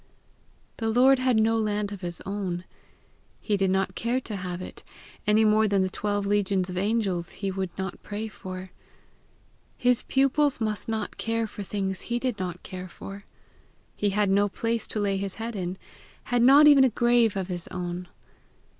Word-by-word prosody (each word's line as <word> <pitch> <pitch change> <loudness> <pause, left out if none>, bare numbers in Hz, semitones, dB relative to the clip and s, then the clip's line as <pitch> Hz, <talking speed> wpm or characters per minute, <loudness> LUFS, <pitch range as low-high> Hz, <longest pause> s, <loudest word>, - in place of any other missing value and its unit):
The 225 -1 -1
Lord 255 +3 +5
had 255 -3 +3
no 225 +1 +3
land 210 -1 -1
of 200 -2 -7
his 175 -2 -3
own. 190 -3 -3 0.7
He 210 - 0
did 195 -1 +1
not 190 0 +1
care 235 +6 0
to 215 - -5
have 180 -2 -4
it, 185 - -9 0.4
any 215 +1 +5
more 215 0 +4
than 200 -2 +2
the 185 - -2
twelve 205 0 -1
legions 195 -2 +1
of - - -6
angels 195 -4 0
he 195 -1 -3
would 190 -1 -2
not 190 -2 -4
pray 210 +2 -5
for: 185 -3 -8 1.1
his 250 -1 +2
pupils 275 +1 +2
must 215 -1 -2
not 220 -2 -3
care 230 0 -1
for 210 - -8
things 195 -1 -3
he 240 - +1
did 245 -4 -2
not 180 -1 -4
care 185 -1 -7
for. 195 +3 -10 0.7
He 205 - 0
had 200 0 +1
no 205 +1 +3
place 230 +3 -2
to 215 - -3
lay 200 -1 +1
his 195 -1 -4
head 225 0 -5
in 185 -1 -3 0.5
had 245 -1 +1
not 275 +5 +8
even 285 -2 +8
a 265 - +5
grave 240 -2 +3
of 190 -2 -2
his 175 -2 -5
own. 180 0 -5
205 Hz, 180 wpm, -26 LUFS, 190-225 Hz, 1.1 s, not